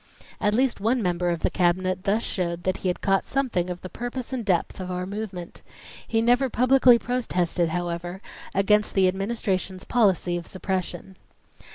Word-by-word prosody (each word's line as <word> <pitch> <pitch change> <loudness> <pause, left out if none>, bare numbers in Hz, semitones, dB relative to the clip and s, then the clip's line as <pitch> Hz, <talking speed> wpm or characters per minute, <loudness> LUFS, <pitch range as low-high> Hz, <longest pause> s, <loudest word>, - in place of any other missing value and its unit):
At 210 0 +2
least 255 -1 +1
one 230 +3 +1
member 175 -1 0
of 170 -2 -1
the - - +1
Cabinet 185 +1 +1
thus 215 +4 +1
showed 175 -2 -2
that 185 - 0
he - - -3
had 180 - -1
caught 195 -1 +2
something 245 -10 -1
of 180 0 -5
the - - -6
purpose 245 +6 -5
and 250 -3 -2
depth 185 -3 0
of 185 -1 -5
our 180 0 -3
movement. 195 -3 -6 0.5
He 225 0 +1
never 245 +3 +3
publicly 255 +1 +5
protested, 180 -9 -1
however, 175 +2 -3 0.4
against 210 +2 +3
the 190 -1 +5
Administration's 190 -1 -2
policy 190 -7 +2
of 170 - -7
suppression. 185 -1 -4
190 Hz, 170 wpm, -25 LUFS, 180-230 Hz, 0.5 s, publicly